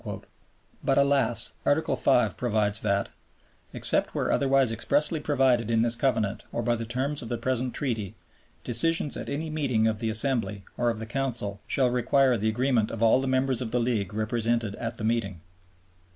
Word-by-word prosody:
But 135 - +2
alas! 140 -5 +2
Article 155 +3 +1
V. 130 -3 +2
provides 110 -3 +1
that 100 -1 0 0.6
"Except - - 0
where - - 0
otherwise 135 -3 +3
expressly 145 +8 0
provided 130 -6 +1
in 115 0 +2
this 115 -1 +3
Covenant 110 -5 -1
or 120 - -3
by 120 +1 +1
the 115 0 -5
terms 135 +5 -2
of 115 - -8
the 120 - -2
present 125 +1 -2
Treaty, 110 -8 -3 0.5
decisions 145 +5 +2
at - - -6
any 155 +2 -3
meeting 130 -8 0
of 110 -1 0
the 115 -1 -1
Assembly 110 -4 -1
or 120 -1 +1
of 115 - -2
the 110 - -6
Council 120 -5 -3
shall 130 -3 +1
require 125 +1 +3
the 110 0 0
agreement 120 -1 +1
of 115 0 -3
all 115 +3 +4
the 135 - -3
Members 130 -1 +1
of 120 - -3
the 125 +2 0
League 115 -6 -1
represented 115 0 -1
at 115 -1 -5
the - - -7
meeting." 110 -6 -1
120 Hz, 180 wpm, -26 LUFS, 110-135 Hz, 0.6 s, all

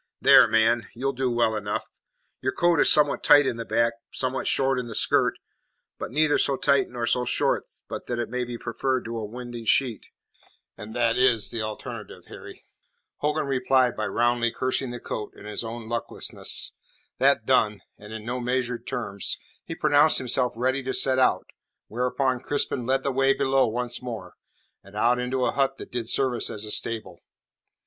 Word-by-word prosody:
"There, - - +7
man, 110 0 +2
you'll 135 +3 -1
do 130 0 -1
well 120 -2 +1
enough. 105 -1 -3 0.6
Your 130 - -1
coat 175 -2 +2
is - - +5
somewhat 150 -2 +3
tight 145 -1 +7
in 120 - -1
the 115 - -5
back, 115 0 +1 0.2
somewhat 130 0 -2
short 135 -1 +2
in 125 - -5
the 115 - -7
skirt; - - +2 0.6
but - - -4
neither 150 +4 +2
so 135 - +2
tight 140 -1 +2
nor 120 -1 -3
so 125 +1 +1
short 125 - 0 0.2
but - - -7
that 120 - -2
it 120 - -2
may 125 +2 -2
be 120 -1 -5
preferred 130 +2 -2
to 115 +1 -4
a - - -5
winding 120 +1 -7
sheet, 120 0 +2 0.7
and 105 +1 -9
that 120 0 +1
is 120 -5 +2
the 115 - -3
alternative, 110 0 -7
Harry." - - -11 0.5
Hogan 150 +1 -1
replied 130 -2 +2
by 110 - -2
roundly 120 0 +1
cursing 130 +2 -2
the 120 0 -6
coat 110 -2 -6
and - - -13
his 105 +2 -3
own 115 0 -7
lucklessness. 115 0 -3 0.5
That - - +3
done 105 -3 +2 0.2
and 105 +1 -12
in 110 -1 -7
no 125 +2 -3
measured 125 -1 -2
terms 110 -7 -2 0.3
he 165 - -6
pronounced 150 0 +4
himself 125 0 0
ready 130 +3 0
to 130 0 -3
set 130 -1 +2
out, 130 - +2 0.4
whereupon 125 +2 0
Crispin 135 -4 -1
led 135 0 +1
the 140 - 0
way 135 +1 +3
below 135 -1 +2
once 120 +2 -3
more, 110 -8 -7 0.5
and 100 +1 -15
out 120 +3 +2
into 125 +1 -1
a - - +1
hut 135 -1 0
that - - -10
did 120 -2 -3
service 130 -3 0
as 105 0 -5
a 105 - -4
stable. 115 0 -2
125 Hz, 185 wpm, -25 LUFS, 115-130 Hz, 0.7 s, There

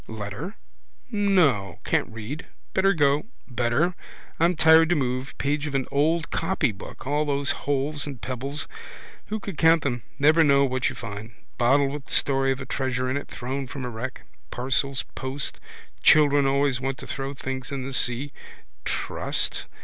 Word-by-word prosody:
Letter? 110 - -6 0.6
No. 180 - +2
Can't - - +1
read. 115 +9 -6 0.3
Better 195 +1 +4
go. 145 +2 +3 0.2
Better. 125 +8 +1 0.5
I'm 170 +2 +4
tired 160 +1 +6
to 175 - +4
move. 130 -1 -2
Page 145 +2 0
of 140 - -4
an 135 -2 +1
old 160 +4 +1
copybook. 155 - -2
All 145 +3 +1
those 140 -1 +1
holes 145 +1 -1
and 135 -4 -6
pebbles. 135 +5 -4 0.6
Who 215 +1 -2
could 200 -5 -7
count 165 -1 +5
them? 125 -4 -1 0.2
Never 155 +3 +5
know 140 -2 +5
what 130 -1 0
you - - -7
find. 110 0 -7 0.2
Bottle 135 +3 +4
with 145 0 -7
story 135 -1 +2
of 135 - -2
a 135 - -5
treasure 130 -1 -1
in - - 0
it, 140 - -3
thrown 130 +2 -4
from 130 +1 -5
a - - -3
wreck. 125 +3 -6 0.3
Parcels 135 +2 0
post. 135 +2 -3 0.4
Children 145 -2 +6
always 135 -2 +2
want 135 0 -2
to - - -9
throw 135 0 -4
things 130 -1 -5
in 135 -2 -3
the 135 - -5
sea. 130 +2 0 0.5
Trust? - - -2
140 Hz, 165 wpm, -25 LUFS, 130-150 Hz, 0.6 s, tired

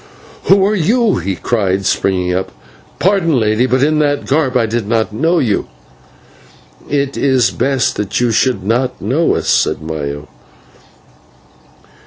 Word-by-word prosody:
"Who 195 0 +4
are 205 - +1
you?" 215 +4 +1
he 95 +2 -3
cried, 95 -3 -1
springing 90 -2 0
up. 95 +1 -3 0.5
"Pardon, 175 -7 +2
Lady, 110 +3 +1
but 130 +1 +1
in 155 +1 +2
that 145 -1 0
garb 135 -3 +1
I 115 - +2
did 115 -1 -3
not 110 -1 0
know 165 +10 +1
you." 115 -10 0 1.2
"It 140 -1 -1
is 130 -4 +2
best 135 0 0
that 105 -2 -2
you 120 -1 +1
should 115 -3 +1
not 125 +5 -1
know 135 - 0
us," - - -3
said - - +1
Maya. 75 -2 -5
125 Hz, 145 wpm, -15 LUFS, 105-145 Hz, 1.2 s, Who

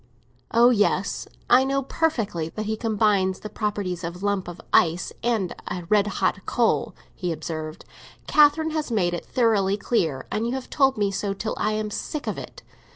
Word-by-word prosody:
"Oh 240 +2 +5
yes, 205 -3 +1 0.2
I 250 +2 +6
know 275 +1 0
perfectly 225 - -1
that 215 +5 -5
he 220 +1 -1
combines 210 -4 +1
the 215 - -7
properties 205 -5 -2
of 170 +1 -4
a 185 +3 -6
lump 200 -3 0
of 175 -1 -8
ice 170 +1 +3
and 225 -7 0
a 180 - -4
red 210 -1 +4
hot 195 -1 -1
coal," 235 -1 +1 0.2
he 180 -2 -3
observed. 155 -1 -5 0.4
"Catherine 305 +2 +4
has 310 -2 -2
made 185 -7 +1
it 175 - -5
thoroughly 205 -5 +2
clear, 170 - 0
and 220 +2 -1
you 240 - -2
have 265 - -6
told 270 -3 +3
me 205 -2 +1
so 195 0 -2
till 220 +2 -3
I 215 - +1
am 215 0 -2
sick 300 +7 -4
of - - -3
it. - - -10
210 Hz, 185 wpm, -24 LUFS, 185-235 Hz, 0.4 s, I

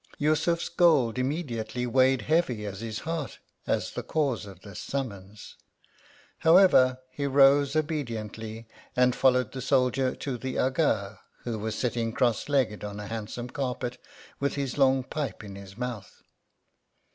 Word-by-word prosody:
Yussufs 155 +3 +1
gold 150 -9 +3
immediately 125 -4 -2
weighed 130 +1 +3
heavy 145 -9 +1
at 100 -2 -5
his 110 -1 -5
heart, 160 -4 -4 0.3
as - - 0
the - - -4
cause 135 -9 -1
of 95 -2 -12
this 100 -3 -9
summons; 105 -7 -6 0.8
however, 160 -7 +6
he 140 +2 -3
arose 140 +1 +5
obediently, 115 -7 -3 0.3
and 125 0 +3
followed 125 -3 +3
the 130 - -6
soldier 130 0 +2
to 130 -4 -4
the 130 +2 -4
Aga, 110 -7 0 0.2
who 115 -3 -3
was 110 +1 -3
sitting 115 -2 -1
cross 120 +1 +1
legged 130 -8 +1
on 105 0 -5
a 105 - -6
handsome 115 +3 -5
carpet, 125 -2 -3 0.4
with 140 0 -1
his 140 -3 -2
long 135 -2 +3
pipe 145 -2 -4
in 100 -2 -9
his 100 0 -11
mouth. 125 -4 -6
125 Hz, 145 wpm, -27 LUFS, 110-140 Hz, 0.8 s, however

